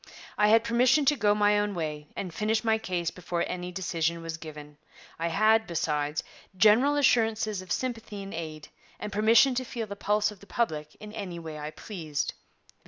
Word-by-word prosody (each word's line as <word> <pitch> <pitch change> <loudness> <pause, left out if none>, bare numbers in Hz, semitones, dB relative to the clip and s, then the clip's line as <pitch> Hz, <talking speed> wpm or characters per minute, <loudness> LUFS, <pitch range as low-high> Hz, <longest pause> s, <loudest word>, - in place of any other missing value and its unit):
I 210 - +4
had 225 +1 +5
permission 250 +5 +3
to 295 - +4
go 210 -5 +3
my 205 0 +4
own 205 -1 -1
way 150 -3 -4
and 180 -4 -5
finish 215 +4 0
my 220 -1 +2
case 180 -6 -2
before 175 -1 -3
any 180 0 -5
decision 170 -2 -1
was 165 -1 -4
given. 150 -2 -10 0.4
I 165 - 0
had, 215 +6 +3
besides, 150 -3 -1 0.3
general 220 +9 +5
assurances 225 -7 +2
of 185 - -11
sympathy 225 -5 -3
and 195 - -8
aid, 155 -2 -6 0.3
and 210 - -5
permission 230 +6 +5
to 255 +1 -1
feel 235 -2 -4
the 200 -1 -7
pulse 210 +1 +1
of 205 - -13
the 200 - -16
public 155 -10 -2
in 210 0 -11
any 190 -5 -5
way 160 -2 -7
I 150 0 -4
pleased. 155 -5 -4
200 Hz, 185 wpm, -28 LUFS, 165-220 Hz, 0.4 s, had